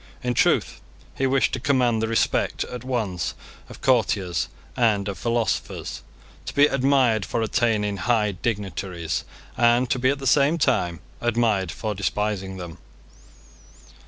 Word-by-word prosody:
In 125 0 0
truth - - +1 0.3
he 135 - 0
wished 135 0 +2
to 130 - -1
command 125 -4 +2
the 110 - 0
respect 115 0 +1
at 125 -1 -7
once 110 -9 -2 0.3
of - - -12
courtiers 100 - +1 0.3
and 110 -5 +2
of 100 - -4
philosophers, 115 -1 -2 0.5
to - - -5
be 145 - +7
admired 130 -6 +2
for 115 - -2
attaining 105 -3 +1
high 105 +1 +1
dignities, 95 -4 -3 0.3
and 120 +1 +4
to 130 - +1
be 130 +1 +3
at 140 - +1
the 135 - -7
same 140 +5 +4
time 90 - +1 0.2
admired 110 -6 +1
for 110 +4 -3
despising 100 -1 -2
them. 85 -3 -8
115 Hz, 140 wpm, -24 LUFS, 100-125 Hz, 0.5 s, be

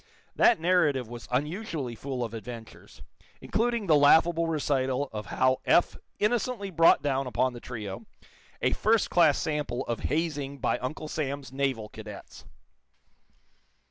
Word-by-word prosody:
That 235 - +5
narrative 160 -8 +2
was 120 +1 -9
unusually 150 - -2
full 130 +1 -4
of 115 -1 -5
adventures, 115 0 -10 0.4
including 235 -1 -1
the 160 -4 +4
laughable 160 +3 +5
recital 140 -3 0
of 105 -2 -5
how 130 0 +1
Eph 175 - +3 0.2
innocently 215 -2 -1
brought 165 -1 +5
down 135 -2 0
upon 130 0 0
the 120 - -8
trio 105 -6 -7 0.6
a - - +2
first 220 0 +2
class 165 -5 +5
sample 150 -5 -2
of 120 - -3
hazing 145 -3 -2
by 125 -2 0
Uncle 150 +4 -5
Sam's 140 -3 -4
naval 135 -5 -1
cadets. 105 -1 -11
140 Hz, 135 wpm, -28 LUFS, 125-165 Hz, 0.6 s, That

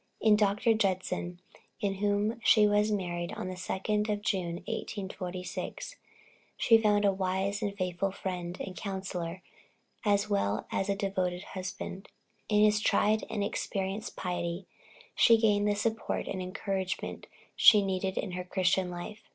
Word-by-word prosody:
In 215 -1 +5
Dr. 210 +2 +3
Judson, 185 -3 -1 0.4
to 200 -3 0
whom 205 +3 0
she 215 -1 +6
was 210 +1 +3
married 175 -4 -2
on 185 - -4
the - - -4
2d 210 +3 -1
of 205 0 -1
June, 180 -5 -1
1846, 190 - -5 0.6
she 225 -1 +6
found 210 -1 +3
a 200 - +5
wise 190 +1 -1
and 200 -1 -2
faithful 185 0 -1
friend 180 -2 -5
and 190 -2 -6
counsellor, 190 -3 -4 0.6
as 205 -1 +2
well 110 - 0
as 195 +1 -1
a 200 - +2
devoted 190 -3 -1
husband. 185 +1 -6 0.4
In 210 -1 +4
his 210 0 +4
tried 215 0 +2
and 210 -2 -1
experienced 200 +1 -3
piety, 175 0 -3 0.5
she 230 - +6
gained 210 -2 +3
the 205 - +2
support 225 +2 -1
and 190 - -3
encouragement 190 0 -3 0.3
she 210 -3 +7
needed 190 0 -1
in 195 - -2
her 180 0 -4
Christian 185 0 +1
life. 180 +5 -7
195 Hz, 145 wpm, -30 LUFS, 185-210 Hz, 0.6 s, she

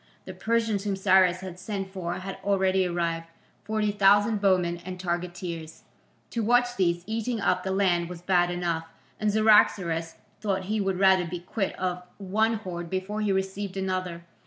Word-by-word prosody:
The - - -7
Persians 225 -3 0
whom 200 -2 -1
Cyrus 185 -2 +4
had 185 -1 -8
sent 195 -1 -4
for 175 -2 -3
had 190 +1 -6
already 190 -2 +2
arrived, 170 -1 -2 0.4
forty 215 -1 0
thousand 205 +1 +4
bowmen 180 -3 +2
and 185 0 -6
targeteers. 175 -2 -4 0.5
To 230 - -1
watch 245 +2 +3
these 175 -3 +1
eating 225 +1 -2
up 185 -2 +1
the 190 - -4
land 180 -3 +1
was 175 -1 -9
bad 175 -1 +3
enough, 170 -2 -2 0.3
and 215 -1 +1
Cyaxares 190 -6 +3 0.2
thought 195 -3 -1
he 210 +3 -1
would 195 -2 0
rather 190 -1 +4
be 175 +1 -5
quit 195 +2 -3
of 180 -1 -2 0.2
one 220 +3 +1
horde 175 -5 -6
before 190 +4 -3
he 210 -2 +1
received 190 0 -2
another. 185 -3 -3
190 Hz, 165 wpm, -27 LUFS, 175-205 Hz, 0.5 s, Cyrus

